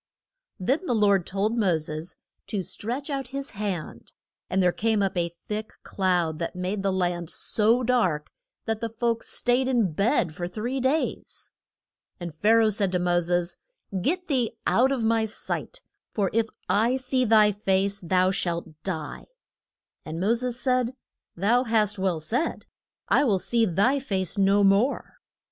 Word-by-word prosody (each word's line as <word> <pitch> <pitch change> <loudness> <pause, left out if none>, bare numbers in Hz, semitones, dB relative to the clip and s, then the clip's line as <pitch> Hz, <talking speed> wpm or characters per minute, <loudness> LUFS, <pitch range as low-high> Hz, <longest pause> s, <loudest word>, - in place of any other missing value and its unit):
Then 275 - 0
the 245 - +1
Lord 200 -4 +3
told 200 +4 0
Mo 185 -6 +3
ses 155 +2 -4 0.3
to 200 -3 -2
stretch 250 - -4
out 270 -2 -3
his 275 +2 -5
hand, 195 -6 -5 0.4
and 190 0 +2
there 180 - +4
came 220 +1 +1
up 195 - -1
a 170 -1 0
thick 210 +5 -6
cloud 175 -5 0
that 170 - -3
made 185 +3 -2
the 195 0 +1
land 175 -3 -1
so 230 +7 +3
dark 185 -12 +1 0.3
that 225 -1 -2
the 230 - -2
folks 230 +1 -2
staid 250 +1 +1
in 235 -8 +2
bed 195 - +1
for 175 +2 -4
three 235 +9 -3
days. 270 +5 -2 0.7
And 175 -3 -6
Pha 185 +8 0
ra 225 - +5
oh - - +4
said 200 -2 0
to - - +3
Mo 175 0 +2
ses, 175 0 -1 0.4
Get 360 - -1
thee 245 -6 0
out 260 +3 +3
of 260 -4 -1
my 225 0 +2
sight. - - -5 0.3
For 200 -3 -1
if 225 0 +2 0.2
I 230 +5 +2
see 260 0 0
thy 215 -2 +5
face 200 0 0
thou 185 +1 +2
shalt 170 -3 -2
die. 160 -6 -5 0.8
And 160 +1 -6
Mo 200 +6 +2
ses 245 +1 -2
said, 255 -1 +1 0.4
Thou 230 +8 +2
hast 215 -3 +1
well 185 -4 0
said: 240 - -2 0.4
I - - +4
will 215 -8 +3
see 230 +4 +1
thy 205 - +2
face 190 -8 -1
no 200 0 +3
more. 200 +8 +2
210 Hz, 165 wpm, -26 LUFS, 180-240 Hz, 0.8 s, ra